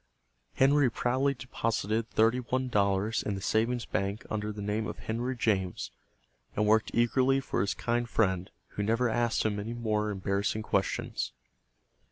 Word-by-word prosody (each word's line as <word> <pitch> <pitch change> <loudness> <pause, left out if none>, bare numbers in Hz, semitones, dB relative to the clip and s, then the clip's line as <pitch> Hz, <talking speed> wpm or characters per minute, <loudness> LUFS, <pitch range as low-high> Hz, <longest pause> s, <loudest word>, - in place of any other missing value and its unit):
Henry 140 0 +4
proudly 130 +5 +1
deposited 115 -3 -1
thirty 115 +3 +3
one 130 +1 -1
dollars 100 0 +1
in 100 - -2
the - - -4
savings 115 +4 +1
bank 100 +3 -2
under 105 0 -2
the 105 - -8
name 105 +2 -1
of - - -6
Henry 120 +4 -3
James, 95 -6 0 0.6
and 105 - +2
worked 110 +1 +3
eagerly 130 +3 +3
for 135 - -1
his 100 - 0
kind 120 0 -1
friend, 95 -6 +1 0.2
who - - -4
never 115 +4 +2
asked 120 0 +1
him 105 -1 0
any 110 +3 -4
more 105 -2 0
embarrassing 100 +2 -1
questions. 100 -2 -1
110 Hz, 155 wpm, -30 LUFS, 105-120 Hz, 0.6 s, Henry